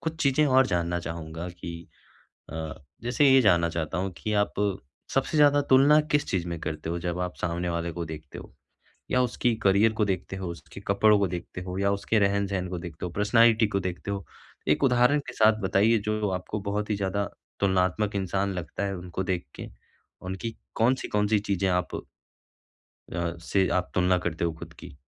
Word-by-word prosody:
कुछ 160 0 -3
चीजें 140 +2 +3
और 130 -1 +5
जानना 85 -2 0
चाहूँगा 80 +1 -6
कि 85 -1 -8 0.6
अ, 80 -1 -4 0.3
जैसे 120 +5 +2
ये 135 0 +7
जानना 85 -5 +4
चाहता 80 0 -3
हूँ 95 +1 -1
कि 105 +8 -3
आप - - -4 0.6
सबसे 135 +3 +1
ज़्यादा 145 -1 +6
तुलना 140 +3 +7
किस 145 0 +2
चीज़ 90 -3 -1
में 85 -1 -4
करते 75 +1 -4
हो 85 - -2
जब 85 0 -3
आप 90 0 -3
सामने 90 0 -1
वाले 85 0 -2
को 85 0 -4
देखते 80 -2 -9
हो - - -11 0.6
या 125 - +4
उसकी 125 -1 +1
करियर 100 +3 +4
को 105 -1 +1
देखते 95 -1 -3
हो, 95 -1 -5
उसके 85 +3 -9
कपड़ों 105 +1 +5
को 100 - +2
देखते 90 +1 -6
हो 90 0 -5
या 100 0 +2
उसके 100 +2 +1
रहन-सहन 100 -2 0
को 90 - -4
देखते 85 -1 -7
हो, 90 - -5
पर्सनैलिटी 110 +3 +4
को 100 - -1
देखते 95 +1 -4
हो, 100 -3 -4 0.4
एक 75 - +2
उदाहरण 125 +2 +4
के - - -6
साथ 110 0 +4
बताइए 100 +4 +3
जो 105 -1 0
आपको 90 +3 -3
बहुत 105 +1 -2
ही 105 - +1
ज़्यादा 100 0 -1 0.3
तुलनात्मक 95 +2 +1
इंसान 100 +1 -1
लगता 90 +2 -4
है 100 -1 -2
उनको 90 +1 -5
देख 90 -5 -2
के - - -8 0.5
उनकी 95 +5 -5 0.2
कौन-सी 125 +4 +2
कौन-सी 105 0 +2
चीज़ें 100 -2 0
आप 90 0 +1 1.3
अ, 85 0 -2
से 95 +2 +1
आप 90 - -6
तुलना 90 0 +3
करते 85 -1 -1
हो 85 - 0
ख़ुद 80 - -10
की, - - -12
95 Hz, 190 wpm, -27 LUFS, 85-110 Hz, 1.3 s, ये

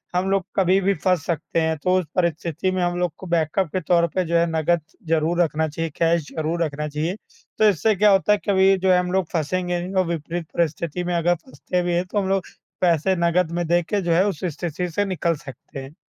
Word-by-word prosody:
हम 185 +2 +1
लोग 195 -2 +2
कभी 190 0 +3
भी 200 +1 +2
फँस 180 -1 0
सकते 165 0 -1
हैं। 160 0 0
तो 185 0 +3
उस 180 - -4
परिस्थिति 170 0 0
में 185 -1 -1
हम 175 0 0
लोग 180 -3 0
को 190 - -9
बैकअप 170 +2 +1
के 185 - -1
तौर 170 +1 +3
पे 185 - +2
जो 170 +1 -1
है 170 - +3
नकद 160 +1 +1 0.3
ज़रूर 165 +2 +2
रखना 160 -1 +1
चाहिए, 165 +2 -3
कैश 165 -2 +1
ज़रूर 165 +2 -1
रखना 150 -1 -3
चाहिए। 155 +5 -2 0.4
तो 215 -1 +5
इससे 205 +3 +2
क्या 210 +1 +5
होता 195 +2 +3
है, - - +2
कभी 195 0 +5
जो 190 0 +2
है 180 - +5
हम 180 0 -2
लोग 190 -1 +1
फँसेंगे 175 +2 -1
नहीं 185 +2 -6
और - - -7
विपरीत 170 +1 -3
परिस्थिति 170 +1 -1
में 175 0 -2
अगर 175 +1 +2
फँसते 160 +4 -4
भी 175 0 -1
हैं, 175 +1 +1
तो 205 +3 -2
हम 190 - -2
लोग 195 -2 +1 0.4
पैसे 175 +1 +2
नकद 170 0 +1
में 175 0 -1
देके 175 +4 +1
जो 175 -2 -1
है 180 +4 +4
उस 190 -4 -4
स्थिति 175 +2 -3
से 205 +5 0
निकल 170 -3 0
सकते 135 -1 -10
हैं। 140 +4 -12
175 Hz, 235 wpm, -22 LUFS, 165-185 Hz, 0.4 s, तो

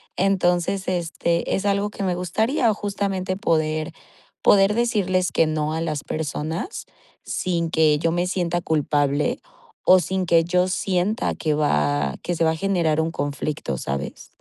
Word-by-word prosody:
Entonces, 185 0 +1
este, 170 -1 -1
es 195 - -1
algo 200 +1 +1
que 205 - -6
me 185 -2 0
gustaría 220 - +1
justamente 195 -2 -2
poder 155 -4 0 0.5
poder 195 +1 +5
decirles 200 -6 +1
que 165 - +3
no 155 0 -1
a 160 - -2
las 155 -3 -2
personas 160 - -4 0.4
sin 170 -2 -1
que 155 -2 +3
yo 165 0 +1
me 175 +1 0
sienta 175 -2 -1
culpable 145 -2 0 0.4
o 185 0 +7
sin 185 +2 -2
que 165 0 +5
yo 180 +2 +1
sienta 190 +4 0
que 155 -2 -1
va 75 - +1
que 175 - -2
se 165 - 0
va 160 - +3
a 160 - -2
generar 165 -4 +1
un 160 +1 -1
conflicto, 145 - -3
¿sabes? 70 +2 -5
170 Hz, 155 wpm, -23 LUFS, 155-190 Hz, 0.5 s, o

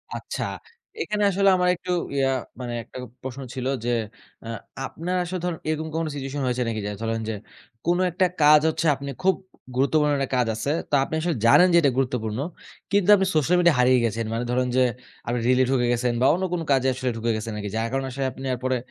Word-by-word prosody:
আচ্ছা। - - -4 0.6
এখানে 210 - -1
আসলে 195 +1 +3
আমার 180 0 +2
একটু 180 - -6 0.2
ইয়া, 135 -1 +2 0.3
মানে 120 -1 -4
১ - - -15
টা - - -7 0.3
প্রশ্ন 130 +1 -6
ছিল 130 0 -3 0.2
যে, - - 0 0.5
অ্যা 115 - -6 0.3
আপনার 180 +3 -4
আসলে 180 +1 -4
ধরুন 170 -3 -2
এরকম 155 0 -2
কোন 165 0 0
সিচুয়েশন 135 +1 -4
হয়েছে 125 0 0
নাকি? 110 -1 -2
যে 105 - -2
ধরেন 115 0 -1
যে, - - -1 0.5
কোন 175 +1 +2
একটা 185 +2 +2 0.2
কাজ 150 0 +7
হচ্ছে 160 +1 -2
আপনে 140 +1 -6
খুব 190 0 +4 0.4
গুরুত্বপূর্ণ 150 +3 +2
একটা 135 -1 -2
কাজ 125 - +2
আছে। 140 +6 -2 0.2
তো - - -13
আপনি 155 - -7
আসলে 170 -2 0
জানেন 180 +10 +7
যে - - +7
এটা 140 -3 +3
গুরুত্বপূর্ণ। 125 -4 -1 0.5
কিন্তু 200 -1 +2
আপনি 195 - +1
সোশ্যাল 160 +4 +3
মিডিয়া 170 -3 +4
হারিয়ে 125 0 +5
গেছেন। 115 +1 -1
মানে 115 +2 -1
ধরেন 125 0 +1
যে, - - +5 0.5
আপনি 120 +1 0
রিলে 130 +1 +4
ঢুকে 120 -2 +2
গেছেন 120 0 +1
বা - - +4
অন্য 180 +3 -1
কোন 175 - -1
কাজে 135 -1 +3
আসলে 125 0 -2
ঢুকে 115 +1 0
গেছেন 110 +1 -4
নাকি, 105 -1 -4
যার 115 +1 0
কারণে 135 0 -1
আসলে 135 +1 -2
আপনি 135 - -10
এরপরে 130 +1 -1
135 Hz, 215 wpm, -24 LUFS, 120-165 Hz, 0.6 s, কাজ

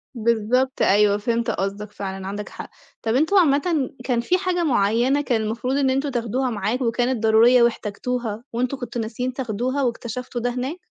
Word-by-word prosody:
بالضبط 235 +3 +1
أيوه، 205 +1 +4
فهمت 230 +2 -1
قصدك، 200 +2 -3
فعلًا 190 -2 -6
عندك 205 +1 -5
حق. - - -9 0.3
طَب 225 +1 0
أنتم 320 +9 +2
عامةً 305 -3 +3
كان 245 -2 0
في 355 +10 +1
حاجة 365 -2 -1
معيّنة 245 +1 +2
كان 245 -6 0
المفروض 230 +4 -2
إن 275 -2 +2
أنتم 270 +2 0
تاخدها 250 +1 -1
معاكم 225 +4 -1
وكانت 240 0 0
ضرورية 230 +3 +6
واحتاجتوها، 235 0 -2
وأنتم 250 +3 -1
كنتم 245 -2 -4
ناسيين 245 +3 -3
تاخدوها 255 +2 -2
واكتشفتوا 240 0 -3
ده 245 - 0
هناك؟ 260 +8 -4
240 Hz, 165 wpm, -22 LUFS, 220-260 Hz, 0.3 s, ضرورية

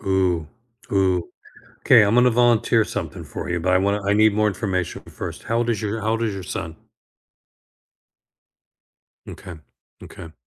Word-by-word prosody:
eOoh, 90 -5 0 0.4
ooh, 95 -3 +1 0.5
'kay, - - +7
I'm 105 +3 +2
gonna 125 0 +5
volunteer 120 -2 +3
something - - -6
for - - -7
you, 85 0 -1
but 90 +2 0
I 90 - +4
wanna 100 +2 0
I 100 +1 +2
need 110 0 +4
more 105 0 +2
information 95 -4 -3
first. - - -8
How 115 - -1
old 120 0 0
is 110 -4 -1
your 110 +1 -3
how 110 +1 -1
old 115 +1 -1
is 110 -3 -2
your 95 - -6
son? 85 -3 -6 2.5
M'kay, 90 -4 -10 0.4
m'kay. 80 - -11
100 Hz, 160 wpm, -22 LUFS, 90-110 Hz, 2.5 s, kay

